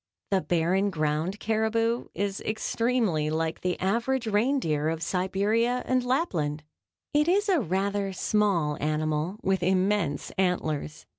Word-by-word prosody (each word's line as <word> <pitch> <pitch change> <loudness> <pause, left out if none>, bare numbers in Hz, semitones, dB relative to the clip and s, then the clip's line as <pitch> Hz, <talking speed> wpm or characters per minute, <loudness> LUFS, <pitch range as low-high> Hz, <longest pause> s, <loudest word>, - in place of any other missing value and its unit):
The 190 -1 +3
barren 180 +4 +1
ground 160 +3 -1
caribou 225 +2 0
is 200 +1 -2
extremely 215 -7 0
like 160 +1 -2
the 180 -1 -1
average 235 +6 0
reindeer 205 - +1
of 165 0 -3
Siberia 205 +7 +1
and 255 -1 +1
Lapland. 170 - -1 0.5
It 300 +1 +3
is 405 +4 +2
a 370 -5 +3
rather 195 +1 -1
small 185 -6 +1
animal 155 +4 -1
with 190 -1 +1
immense 185 -4 +1
antlers. 155 -5 -1
195 Hz, 125 wpm, -27 LUFS, 160-225 Hz, 0.5 s, The